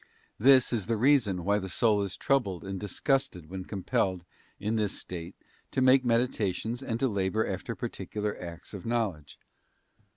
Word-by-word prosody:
This 130 Hz, +2 st, +6 dB
is 105 Hz, -5 st, -1 dB
the 115 Hz, -1 st, +1 dB
reason 110 Hz, -8 st, +3 dB
why 100 Hz, +1 st, +3 dB
the 95 Hz, -1 st, -5 dB
soul 105 Hz, +3 st, +3 dB
is 100 Hz, -2 st, -3 dB
troubled 110 Hz, -11 st, 0 dB
and 95 Hz, -1 st, -4 dB
disgusted 100 Hz, -, -1 dB
when 95 Hz, -1 st, -5 dB
compelled, 95 Hz, -2 st, -1 dB, 0.3 s
in 105 Hz, +3 st, -1 dB
this 105 Hz, -3 st, -1 dB
state, 85 Hz, -2 st, -7 dB, 0.3 s
to -, -, -2 dB
make 130 Hz, 0 st, +6 dB
meditations 115 Hz, -1 st, 0 dB
and 115 Hz, -3 st, -3 dB
to 135 Hz, -, +2 dB
labour 100 Hz, 0 st, 0 dB
after -, -, -4 dB
particular 105 Hz, -1 st, -4 dB
acts 85 Hz, +1 st, -8 dB
of 100 Hz, -, -7 dB
knowledge. 100 Hz, -12 st, -2 dB
105 Hz, 160 wpm, -29 LUFS, 95-120 Hz, 0.3 s, This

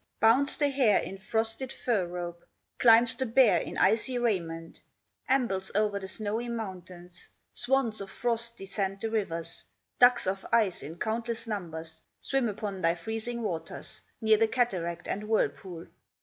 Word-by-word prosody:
Bounds 250 Hz, +6 st, +4 dB
the 290 Hz, -, +3 dB
hare 260 Hz, -7 st, +4 dB
in 195 Hz, -, -4 dB
frosted 225 Hz, +5 st, -1 dB
fur 215 Hz, -10 st, 0 dB
robe, 175 Hz, -1 st, -6 dB, 0.4 s
Climbs 230 Hz, 0 st, +6 dB
the 260 Hz, -, -2 dB
bear 235 Hz, 0 st, +5 dB
in -, -, -6 dB
icy 225 Hz, +5 st, +2 dB
raiment, 170 Hz, -8 st, -2 dB, 0.5 s
Ambles 215 Hz, -8 st, +1 dB
o'er 205 Hz, -1 st, +2 dB
the 190 Hz, -, -7 dB
snowy 215 Hz, +4 st, -3 dB
mountains. 180 Hz, -6 st, -7 dB, 0.2 s
Swans 245 Hz, -4 st, 0 dB
of 195 Hz, -, -6 dB
frost 235 Hz, 0 st, -2 dB
descend 195 Hz, 0 st, -3 dB
the 225 Hz, +2 st, -3 dB
rivers, 170 Hz, -7 st, -3 dB, 0.4 s
Ducks 250 Hz, 0 st, +6 dB
of 190 Hz, +1 st, -2 dB
ice 215 Hz, -6 st, +3 dB
in 155 Hz, +5 st, -8 dB
countless 230 Hz, +3 st, -2 dB
numbers 165 Hz, -7 st, -6 dB, 0.2 s
Swim 270 Hz, -4 st, 0 dB
upon 200 Hz, -2 st, -5 dB
thy 165 Hz, 0 st, +3 dB
freezing 225 Hz, +6 st, -4 dB
waters, 175 Hz, -6 st, -5 dB, 0.2 s
Near 220 Hz, -1 st, +5 dB
the 225 Hz, +1 st, +3 dB
cataract 180 Hz, -9 st, -1 dB
and 205 Hz, +2 st, -3 dB
whirlpool. 185 Hz, -5 st, -1 dB
215 Hz, 150 wpm, -29 LUFS, 185-235 Hz, 0.5 s, Climbs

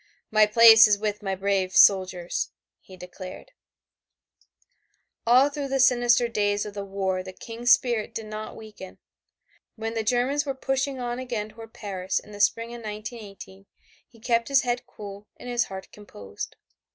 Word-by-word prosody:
"My 215 Hz, -1 st, +5 dB
place 225 Hz, 0 st, +8 dB
is 205 Hz, -1 st, +3 dB
with 210 Hz, 0 st, -3 dB
my 195 Hz, -2 st, -2 dB
brave 190 Hz, -1 st, -1 dB
soldiers," 185 Hz, -3 st, +3 dB, 0.3 s
he 185 Hz, -, -15 dB
declared. 185 Hz, -, -10 dB, 1.8 s
All 255 Hz, +4 st, +6 dB
through 285 Hz, -1 st, -4 dB
the 270 Hz, 0 st, -1 dB
sinister 240 Hz, -2 st, +4 dB
days 205 Hz, -2 st, 0 dB
of 210 Hz, -, -7 dB
the 200 Hz, -1 st, -5 dB
war 190 Hz, -1 st, -2 dB
the 185 Hz, 0 st, -8 dB
King's 235 Hz, +5 st, -5 dB
spirit 235 Hz, -4 st, +2 dB
did 225 Hz, -, -4 dB
not 215 Hz, 0 st, -7 dB
weaken. 215 Hz, -4 st, -11 dB, 0.8 s
When 225 Hz, 0 st, -4 dB
the 225 Hz, -, -1 dB
Germans 250 Hz, +5 st, +1 dB
were 275 Hz, -2 st, -4 dB
pushing 270 Hz, 0 st, -2 dB
on 245 Hz, 0 st, -3 dB
again 230 Hz, -4 st, -4 dB
toward 225 Hz, +1 st, -13 dB
Paris 190 Hz, -3 st, -3 dB
in 210 Hz, -, -5 dB
the 205 Hz, -, -10 dB
spring 230 Hz, +3 st, +1 dB
of 240 Hz, -, -8 dB
1918, 210 Hz, -3 st, -9 dB, 0.4 s
he 230 Hz, -, -21 dB
kept 230 Hz, 0 st, 0 dB
his 275 Hz, -1 st, +3 dB
head 245 Hz, 0 st, -2 dB
cool 205 Hz, 0 st, -10 dB
and -, -, -11 dB
his 240 Hz, -1 st, 0 dB
heart 190 Hz, 0 st, -9 dB
composed. 100 Hz, -, -9 dB
215 Hz, 165 wpm, -25 LUFS, 200-240 Hz, 1.8 s, place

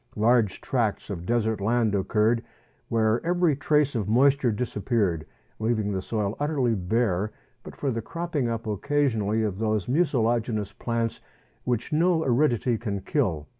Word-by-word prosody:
Large 110 Hz, -2 st, +2 dB
tracts 115 Hz, -5 st, -1 dB
of 90 Hz, -2 st, -6 dB
desert 110 Hz, -3 st, 0 dB
land 115 Hz, 0 st, +1 dB
occurred, 110 Hz, +4 st, +1 dB, 0.5 s
where 110 Hz, 0 st, +1 dB
every 175 Hz, -3 st, +2 dB
trace 145 Hz, 0 st, +2 dB
of 105 Hz, -5 st, -2 dB
moisture 130 Hz, +1 st, +4 dB
disappeared, 105 Hz, -7 st, -1 dB, 0.3 s
leaving 110 Hz, -2 st, 0 dB
the 95 Hz, -1 st, -2 dB
soil 105 Hz, +1 st, -2 dB
utterly 145 Hz, -5 st, +1 dB
bare 105 Hz, 0 st, 0 dB, 0.3 s
but -, -, -11 dB
for 140 Hz, -, -1 dB
the 115 Hz, -1 st, -2 dB
cropping 160 Hz, -2 st, -2 dB
up 115 Hz, 0 st, -3 dB
occasionally 110 Hz, -2 st, 0 dB
of 100 Hz, -2 st, -2 dB
those 110 Hz, -3 st, 0 dB
mucilaginous 120 Hz, -, +1 dB
plants 115 Hz, 0 st, -2 dB, 0.4 s
which 125 Hz, +4 st, -1 dB
no 165 Hz, +1 st, +3 dB
aridity 125 Hz, -3 st, +2 dB
can 100 Hz, -4 st, -3 dB
kill. 95 Hz, -, -1 dB
115 Hz, 140 wpm, -26 LUFS, 105-130 Hz, 0.5 s, moisture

